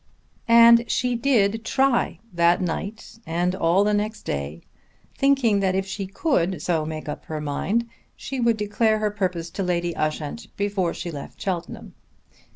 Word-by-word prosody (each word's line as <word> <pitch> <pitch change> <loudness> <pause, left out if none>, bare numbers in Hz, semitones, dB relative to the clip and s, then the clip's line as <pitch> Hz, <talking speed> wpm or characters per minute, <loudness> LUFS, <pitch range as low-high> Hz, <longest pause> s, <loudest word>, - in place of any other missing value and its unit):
And 235 0 +7
she 250 -1 +1
did 225 -4 +2
try 240 -9 +1 0.2
that 170 0 +3
night 200 +5 -5
and 175 +1 -1
all 185 +1 +2
the 210 0 +1
next 210 +1 -2
day, 70 +3 -4 0.5
thinking 270 -7 +3
that 190 -1 +1
if 190 0 0
she 195 0 -5
could 190 - 0
so 160 -1 -1
make 155 -1 -6
up 150 - -6
her 155 -1 -4
mind 190 +11 -1 0.3
she 270 - -5
would 235 -2 +2
declare 215 +1 +1
her 215 -1 0
purpose 180 -5 -3
to - - -4
Lady 175 -2 -1
Ushant 155 +6 -3
before 200 -4 -1
she 175 - -5
left 145 -3 -9
Cheltenham. 180 -4 -4
195 Hz, 160 wpm, -24 LUFS, 170-225 Hz, 0.5 s, And